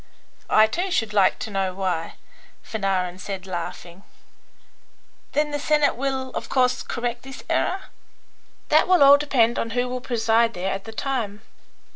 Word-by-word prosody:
"I, 215 - +6
too, 350 - -2
should 225 -11 0
like 200 -2 +4
to 220 - -6
know 190 -2 -1
why," 180 -4 -2 0.5
Fanarin 190 -4 -2
said, 190 -1 -6
laughing. 175 0 -6 1.3
"Then 295 +1 +1
the 290 - -2
Senate 300 0 +2
will, 265 +1 -2
of - - -5
course, 250 -1 +2
correct 240 0 -3
this 270 +1 -10
error?" 380 +1 0 0.9
"That 310 - +4
will 365 -5 +5
all 280 +1 +8
depend 245 -5 +2
on 230 - -2
who 245 0 +1
will 250 0 -4
preside 230 -1 +1
there 185 +2 -2
at 195 0 -6
the 225 - -8
time. 220 -4 -3
230 Hz, 155 wpm, -23 LUFS, 195-270 Hz, 1.3 s, all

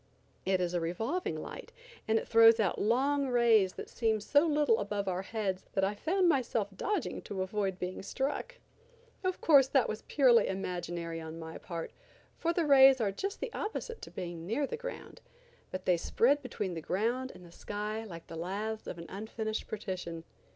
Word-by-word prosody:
It 190 -1 +2
is 180 -1 -1
a 175 - +1
revolving 225 - -2
light, - - -8 0.4
and 220 0 +3
it - - -3
throws 225 0 +7
out 200 -5 +1
long 275 +6 +2
rays 230 -6 +4
that - - -7
seem 220 -2 0
so 285 +9 +3
little 295 -7 +3
above 200 -1 -2
our 185 0 -1
heads 195 -2 -3
that 195 - +1
I 195 +2 +2
found 360 - +1
myself 240 -9 +1
dodging 405 - -2
to 190 -2 -3
avoid 195 -1 -2
being 180 0 -4
struck. 275 - -3 0.7
Of 370 -1 -1
course, 280 -5 +6
that 265 -2 +3
was 215 - -4
purely 255 -5 +5
imaginary 175 -3 -4
on 160 0 -7
my 160 0 -8
part, 170 -2 -6 0.4
for 335 - 0
the 340 -1 +1
rays 270 -2 +8
are 210 -4 +1
just 395 - -4
the - - -4
opposite 455 +2 -4
to - - -8
being 170 -1 -6
near 240 +8 0
the 275 - -4
ground, - - -8 0.5
but 185 0 -6
they 180 -2 +4
spread 270 +11 +2
between 210 -8 -4
the 165 - -5
ground 235 +10 -1
and 180 - -13
the 170 - -14
sky 210 +4 -4
like 170 -6 -9
the 165 - -9
laths 205 +6 -4
of - - -5
an 170 - -8
unfinished 220 +2 -4
partition. 180 -5 -5
215 Hz, 185 wpm, -31 LUFS, 185-270 Hz, 0.7 s, rays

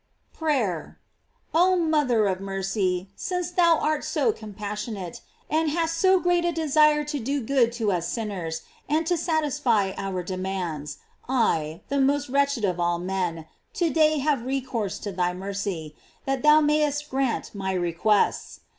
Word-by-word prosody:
PEAYEE. 250 - -1 0.6
Oh 365 +3 +4
mother 300 - +2
of 190 -2 0
mercy! 195 -1 -2
since 360 -1 -3
thou 340 -2 +4
art 310 0 0
so 455 - +1
com 215 - -10
passionate, 210 -3 -5 0.3
and 315 +1 +1
hast 330 +1 0
so 375 +2 +4
great 350 -1 +2
a 345 - +1
desire 305 -1 +3
to 295 -1 -3
do 275 +4 -1
good 250 -1 +2
to 225 -4 0
us 170 -2 -1
sinners, 180 -8 -4 0.3
and 315 +2 +1
to 350 - +2
satisfy 295 - +1
our 190 -2 -3
demands, 185 -5 -4 0.3
I, 165 -11 +1
the 280 0 +1
most 280 +1 +1
wretched 280 -4 +2
of 180 -2 -1
all 175 0 +1
men, 175 -3 -2 0.3
to 340 -3 +1
day 310 +1 +4
have 285 -2 +1
recourse 245 -6 -2
to 205 - -5
thy 180 -1 -1
mercy, 190 -5 -4 0.3
that 270 -1 -1
thou 300 +1 +6
mayest 295 -1 +1
grant 265 -3 -1
my 190 -2 -2
re 175 -2 -1
quests. 205 +5 +1
240 Hz, 155 wpm, -25 LUFS, 190-300 Hz, 0.6 s, thou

